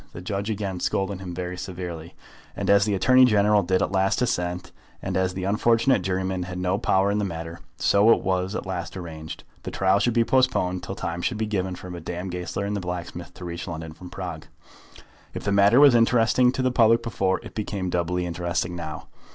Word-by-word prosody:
The - - -7
judge 100 +3 -3
again 100 -4 -3
scolded 95 +1 -1
him 90 -2 -7
very 90 0 -4
severely; 85 -3 -7 0.4
and - - 0
as 100 0 +5
the 105 -2 0
Attorney 130 +6 +5
General 105 -3 +4
did 95 0 +1
at - - -2
last 95 0 +1
assent, 90 -6 -2 0.3
and - - -4
as 95 0 0
the 95 - -4
unfortunate 115 +4 +2
jurymen 95 0 -2
had 90 0 -5
no 90 +2 0
power 95 +1 +2
in 105 - 0
the - - 0
matter, 85 -2 -5 0.2
so 100 +3 +4
it - - +3
was 95 +1 -1
at - - -4
last 95 -1 -5
arranged. 80 -3 -8 0.2
The - - -6
trial 95 +1 +2
should 120 +2 +1
be 115 - +4
postponed 115 -8 +1
till - - -6
time 85 +1 -4
should 110 - -1
be 110 - -1
given 95 -3 -2
for 90 0 -9
Madame 90 +2 -5
Goesler 90 +3 -4
and 105 +1 -2
the - - -1
blacksmith 90 -1 -6
to 90 - -9
reach 85 +1 -6
London 80 -2 -6
from 90 +2 -11
Prague. - - -7 0.9
If - - -5
the 100 - -1
matter 100 +5 +5
was 145 -3 +8
interesting 120 +1 +4
to 130 - -1
the 130 - +2
public 115 -1 +4
before, 95 -5 0
it - - -10
became 100 -4 -3
doubly 90 +1 -1
interesting 85 0 -2
now. 80 -3 -6
95 Hz, 210 wpm, -24 LUFS, 90-105 Hz, 0.9 s, was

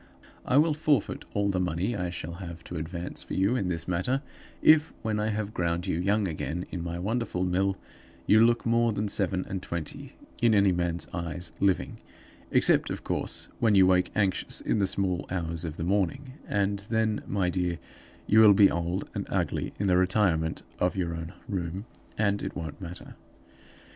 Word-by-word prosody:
I 130 - +3
will 155 +1 +5
forfeit 150 -5 0
all 100 0 +2
the 95 -2 0
money 90 +6 -1
I 90 -2 -2
shall 85 -1 -6
have 85 -2 -8
to 85 - -6
advance 85 +2 -5
for - - -6
you 100 +6 +2
in 100 -7 0
this 85 -2 -3
matter, 95 +11 0 0.4
if, 155 0 +6
when 110 -2 -1
I 105 - 0
have 110 -1 -2
ground 85 0 -1
you 90 -4 -1
young 100 +2 +1
again 85 +1 -3
in 90 -3 -4
my 85 0 -4
wonderful 105 0 -1
mill, 95 +2 +1 0.5
you 110 +1 +6
look 120 0 +3
more 115 0 +3
than 105 +1 -1
seven 95 -2 0
and 95 -1 -4
twenty 85 -4 -5 0.3
in 115 -2 +5
any 100 -1 +5
man's 85 -1 -1
eyes 85 0 -5
living 95 -2 +1 0.5
except, - - +3
of - - -5
course, - - -2
when 110 -3 +3
you 95 -1 +7
wake 90 0 +3
anxious 100 -3 +1
in - - 0
the 100 - +3
small 95 -2 0
hours 85 -2 -2
of 80 -1 -5
the - - -3
morning; 100 +9 -1
and 100 0 0
then, 110 -1 +1
my 95 -3 0
dear, 90 -1 -1 0.5
you 110 - +5
will 105 -2 +8
be 100 0 +6
old 85 +3 -2
and - - -4
ugly - - -1
in 100 - 0
the 90 -2 +4
retirement 90 -4 +1 0.2
of 90 +2 +1
your 85 -3 -1
own 80 +1 -5 0.2
room, 95 0 -3 0.3
and 100 -1 +1
it - - -5
won't 80 +1 -6
matter. 90 -1 -8
95 Hz, 190 wpm, -28 LUFS, 85-105 Hz, 0.5 s, will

